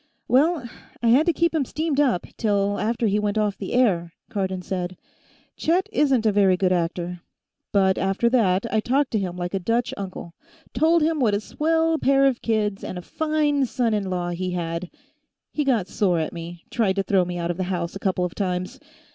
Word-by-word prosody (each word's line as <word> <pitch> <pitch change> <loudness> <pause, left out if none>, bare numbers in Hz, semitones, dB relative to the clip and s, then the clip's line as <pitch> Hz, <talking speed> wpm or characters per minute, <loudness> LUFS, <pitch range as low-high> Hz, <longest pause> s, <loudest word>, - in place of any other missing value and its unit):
"Well, 280 +2 +2 0.4
I 230 - +4
had 280 +8 +5
to - - +5
keep 335 0 +1
him 315 -3 +1
steamed 305 +2 -2
up, 255 -12 +2
till 205 -2 0
after 230 +2 0
he 205 0 +2
went 210 0 -1
off 210 -2 +1
the 195 - -5
air," 180 -10 +2 0.2
Cardon 190 -2 -2
said. 180 -1 -4 0.6
"Chet 360 +5 +1
isn't 270 - +2
a 215 - +4
very 195 -2 +4
good 185 -1 +1
actor. 175 0 -2 0.5
But 190 -2 +3
after 195 +4 +1
that, 200 -6 +2
I 220 - +3
talked 265 +5 +1
to 220 - +1
him 180 -2 -4
like 175 +1 -4
a 195 - 0
Dutch 230 +6 0
uncle. 185 -3 -7 0.4
Told 320 +5 +3
him 315 0 +1
what 220 -6 +3
a - - 0
swell 320 +7 0
pair 275 0 +4
of 265 -3 +1
kids 210 -3 -1
and 185 - -5
a 180 - -7
fine 300 - 0
son 235 -2 0
in 200 -3 -1
law 175 -1 -2
he 180 +1 -3
had. 170 0 -3 0.6
He 300 - -1
got 235 -9 +1
sore 185 -2 +1
at 160 -1 -2
me. 170 0 -8
Tried 210 -6 +1
to 195 - 0
throw 195 -2 +3
me 175 0 -4
out 170 0 -1
of 175 - -6
the 185 - -1
house, 175 -1 -2
a - - -5
couple 185 -2 0
of 180 - -5
times. 185 +5 -3
205 Hz, 210 wpm, -24 LUFS, 180-260 Hz, 0.6 s, had